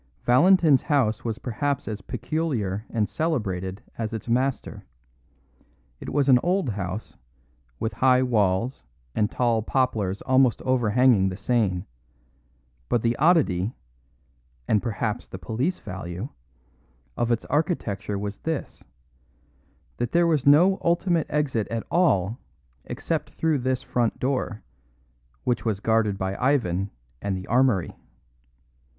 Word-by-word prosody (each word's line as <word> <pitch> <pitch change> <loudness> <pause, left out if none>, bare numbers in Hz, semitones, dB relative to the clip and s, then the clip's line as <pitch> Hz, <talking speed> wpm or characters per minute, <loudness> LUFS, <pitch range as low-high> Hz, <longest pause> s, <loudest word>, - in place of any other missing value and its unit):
Valentin's 155 +2 +5
house 125 -8 +1
was 115 -2 -3
perhaps 135 +4 -2
as 105 -2 -4
peculiar 120 - -2
and 110 -3 0
celebrated 100 - -2 0.2
as 110 0 -3
its 110 - -5
master. 130 +3 -1 1.2
It - - -7
was 140 0 +1
an 130 -2 +6
old 180 -4 +1
house, 100 0 -5 0.6
with 110 - -2
high 130 0 +4
walls 110 0 +1 0.3
and 105 -1 +1
tall 115 -2 +1
poplars 110 -5 -1
almost 130 -2 +3
overhanging 120 -4 +3
the 95 - -6
Seine; 100 -4 0 1.0
but 120 - +1
the 115 0 +2
oddity 130 - +2 0.9
and 105 -2 +3
perhaps 110 -2 -3
the - - -8
police 115 - -2
value 95 +3 -6 0.9
of 120 0 0
its 115 - 0
architecture 110 - -1
was 100 +1 -5
this: 160 -3 -4 1.1
that 120 0 -2
there 170 0 +4
was 155 -5 +1
no 175 +7 +6
ultimate 170 -1 +1
exit 140 -7 0
at 115 -1 -4
all 115 - +2 0.5
except - - -3
through 160 -3 0
this 130 +1 -1
front 120 -4 0
door, 130 -4 -2 0.8
which 125 -1 0
was 110 -4 -1
guarded 110 -2 +1
by 95 +1 -2
Ivan 100 -8 +1 0.3
and 100 -2 -2
the 95 - -7
armoury. 125 -7 +2
120 Hz, 125 wpm, -25 LUFS, 105-135 Hz, 1.2 s, an